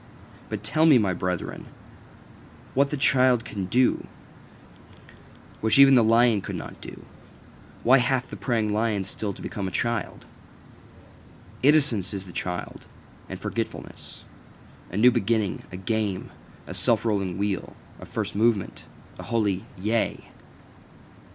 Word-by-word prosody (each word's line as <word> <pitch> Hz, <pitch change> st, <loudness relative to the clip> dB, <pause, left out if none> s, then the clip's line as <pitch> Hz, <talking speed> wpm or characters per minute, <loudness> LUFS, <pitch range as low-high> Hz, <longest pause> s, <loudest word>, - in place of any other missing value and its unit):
But -, -, -5 dB
tell 160 Hz, +1 st, +2 dB
me, 150 Hz, -5 st, +7 dB
my 100 Hz, -5 st, +1 dB
brethren, 90 Hz, -1 st, -4 dB, 1.1 s
what 140 Hz, +1 st, +2 dB
the 150 Hz, -, -3 dB
child 130 Hz, -3 st, +3 dB
can 100 Hz, -3 st, -4 dB
do, 125 Hz, +6 st, +2 dB, 1.5 s
which 110 Hz, +3 st, +2 dB
even 140 Hz, 0 st, +8 dB
the 120 Hz, -3 st, +6 dB
lion 115 Hz, -1 st, +4 dB
could -, -, -6 dB
not -, -, -8 dB
do? -, -, -10 dB, 0.8 s
Why 130 Hz, +3 st, +6 dB
hath 125 Hz, +1 st, 0 dB
the -, -, -5 dB
preying 110 Hz, -4 st, -1 dB
lion 105 Hz, -2 st, 0 dB
still 100 Hz, +1 st, -4 dB
to -, -, -11 dB
become 100 Hz, -2 st, -4 dB
a 95 Hz, -, -3 dB
child? 120 Hz, -2 st, -3 dB, 1.4 s
Innocence 130 Hz, -, +3 dB
is 95 Hz, -1 st, -5 dB
the 90 Hz, -, -12 dB
child, 90 Hz, +1 st, -5 dB, 0.4 s
and -, -, -6 dB
forgetfulness, -, -, -6 dB, 0.7 s
a 90 Hz, -, -4 dB
new 125 Hz, +4 st, +6 dB
beginning, 110 Hz, -4 st, 0 dB
a 90 Hz, -, -6 dB
game, 100 Hz, -1 st, -2 dB, 0.3 s
a -, -, -7 dB
self 110 Hz, +5 st, +1 dB
rolling 100 Hz, -5 st, -1 dB
wheel, 100 Hz, -2 st, -2 dB, 0.2 s
a -, -, -10 dB
first -, -, -3 dB
movement, 110 Hz, -2 st, 0 dB, 0.3 s
a -, -, -6 dB
holy 105 Hz, -5 st, 0 dB
Yea. 110 Hz, +4 st, -2 dB
110 Hz, 135 wpm, -25 LUFS, 100-125 Hz, 1.5 s, even